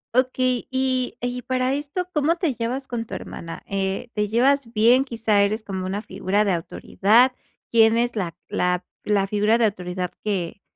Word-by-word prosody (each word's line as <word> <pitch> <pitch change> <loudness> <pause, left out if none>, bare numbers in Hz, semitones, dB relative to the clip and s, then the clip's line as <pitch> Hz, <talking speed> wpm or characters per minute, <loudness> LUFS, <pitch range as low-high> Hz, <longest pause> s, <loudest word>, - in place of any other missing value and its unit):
Okey, 255 -1 +1
y 260 -1 0
y 245 0 -3
para 255 +1 0
esto, 295 +6 -3
¿cómo 305 +2 +2
te 335 -6 0
llevas 250 +3 -3
con 230 -2 -3
tu - - -6
hermana? 165 0 -8
Eh, 195 +4 -2
¿te 210 -1 0
llevas 250 +2 +2
bien? 240 +4 +4
¿Quizá 225 -4 +1
eres 215 +2 +1
como 190 -2 -4
una 200 +3 -3
figura 205 +3 0
de 200 - +2
autoridad? 215 +8 +2 0.4
¿Quién 225 0 +5
es 240 0 0
la 175 -6 -3
la 180 0 0 0.2
la 205 -2 +2
figura 210 +3 +2
de 235 - +3
autoridad 180 -2 -3
que, 195 -3 -2
225 Hz, 175 wpm, -23 LUFS, 200-255 Hz, 0.4 s, Quién